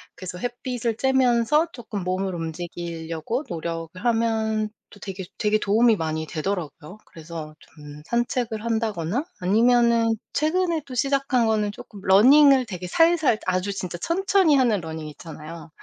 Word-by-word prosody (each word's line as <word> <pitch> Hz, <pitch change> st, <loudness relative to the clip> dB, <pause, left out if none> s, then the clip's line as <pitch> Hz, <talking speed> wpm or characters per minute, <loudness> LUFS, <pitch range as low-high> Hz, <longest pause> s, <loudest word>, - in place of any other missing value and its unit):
그래서 180 Hz, -1 st, -7 dB
햇빛을 245 Hz, -1 st, -3 dB
쬐면서 265 Hz, +5 st, +2 dB
쪼끔 215 Hz, -6 st, -6 dB
몸을 185 Hz, +1 st, -2 dB
움직이려고 170 Hz, -, -4 dB
노력을 165 Hz, -1 st, -4 dB
하면 220 Hz, -2 st, +1 dB, 0.2 s
또 205 Hz, -, -16 dB
되게 190 Hz, -2 st, -6 dB
되게 215 Hz, 0 st, +1 dB
도움이 220 Hz, +2 st, +3 dB
많이 160 Hz, 0 st, -2 dB
되더라고요. 165 Hz, +1 st, -5 dB
그래서 160 Hz, -1 st, -9 dB
좀 150 Hz, -1 st, -13 dB
산책을 235 Hz, -1 st, -1 dB
한다거나 220 Hz, -, -1 dB, 0.2 s
아니면은 230 Hz, +3 st, +3 dB, 0.2 s
최근에 335 Hz, +1 st, +1 dB
또 255 Hz, -, -7 dB
시작한 275 Hz, -2 st, +1 dB
거는 210 Hz, -2 st, +1 dB
쪼끔 205 Hz, -, -12 dB
러닝을 260 Hz, +7 st, +6 dB
되게 180 Hz, -4 st, -6 dB
살살 330 Hz, -, +3 dB
아주 185 Hz, +2 st, 0 dB
진짜 180 Hz, -3 st, -5 dB
천천히 370 Hz, -, +2 dB
하는 240 Hz, -7 st, +3 dB
러닝 160 Hz, -1 st, -6 dB
있잖아요. 160 Hz, +2 st, -10 dB
215 Hz, 325 characters per minute, -24 LUFS, 175-245 Hz, 0.2 s, 러닝을